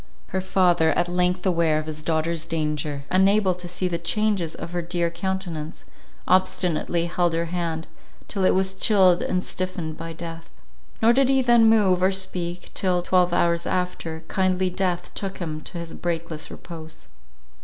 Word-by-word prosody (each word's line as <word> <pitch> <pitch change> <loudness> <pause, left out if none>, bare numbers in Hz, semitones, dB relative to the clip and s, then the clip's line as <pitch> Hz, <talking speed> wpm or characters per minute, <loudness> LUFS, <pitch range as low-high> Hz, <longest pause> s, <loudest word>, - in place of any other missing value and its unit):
Her 190 - -1
father, 180 -3 +3
at 175 +3 +1
length 180 +1 0
aware 165 -4 +2
of 155 - -2
his 155 -1 -5
daughter's 165 +1 -1
danger, 150 -3 -2
unable 195 +1 +4
to 180 0 -8
see 180 +1 -2
the 170 -1 -2
changes 195 -2 0
of 170 - -7
her 175 0 -2
dear 170 0 -1
countenance, 170 -4 -4 0.4
obstinately 180 -2 +1
held 175 0 0
her 165 +1 0
hand, 165 -2 -2 0.4
till 195 - -2
it 185 - +4
was 190 0 +1
chilled 190 -3 +4
and 185 0 -1
stiffened 180 -4 -3
by 165 0 -6
death. 165 0 -8 0.5
Nor 230 +2 +6
did 265 +1 +3
he 270 -1 +3
then 235 -2 +6
move 195 -5 +4
or 185 +1 +4
speak, 180 -2 -4
till, 180 -2 +1
twelve 180 -1 +3
hours 170 -1 +1
after, 170 -3 -3
kindly 185 -1 +1
death 180 -1 -2
took 195 -1 -4
him 155 -3 -4
to - - -7
his 170 -1 -6
breakless 165 -2 -4
repose. 160 -2 -10
175 Hz, 165 wpm, -24 LUFS, 165-185 Hz, 0.5 s, Nor